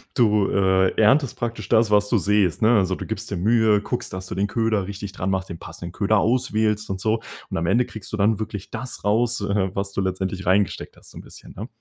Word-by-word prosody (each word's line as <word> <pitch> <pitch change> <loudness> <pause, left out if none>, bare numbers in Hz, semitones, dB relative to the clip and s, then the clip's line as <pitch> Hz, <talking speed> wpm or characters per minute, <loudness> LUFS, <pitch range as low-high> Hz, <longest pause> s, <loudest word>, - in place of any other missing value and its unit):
du, 105 -4 +3
äh, 95 -1 +3
erntest 130 +5 +3
praktisch 115 -4 -4
das, 110 -2 +3
was 105 0 +3
du 115 - +3
sähst, 100 -1 +1
ne? 115 +2 +5
Also, 95 -1 0
du - - -7
gibst 110 0 -5
dir 100 - -3
Mühe, 110 +1 +3
guckst, 120 +4 -4
dass 95 0 -6
du - - -6
den 100 +2 0
Köder 110 -3 0
richtig 100 0 -6
dran 95 0 -3
machst, 95 0 -2
den 85 - -7
passenden 85 0 -9
Köder 105 +3 +1
auswählst 110 -2 +1
und 95 -1 -3
so. 110 +2 0 0.3
Und - - -2
am 85 +1 -1
Ende 120 +5 +3
kriegst 110 -4 -10
du 110 - -3
dann 105 +2 +2
wirklich 105 -3 -6
das 130 - -6
raus, 115 +2 +1
äh, 100 -1 0
was 100 0 -3
du 100 - -1
letztendlich 95 0 -3
reingesteckt 95 +1 0
hast, - - -16
so - - -13
'n - - -8
bisschen, - - -14
ne? 110 +6 -6
105 Hz, 240 wpm, -23 LUFS, 95-110 Hz, 0.3 s, ne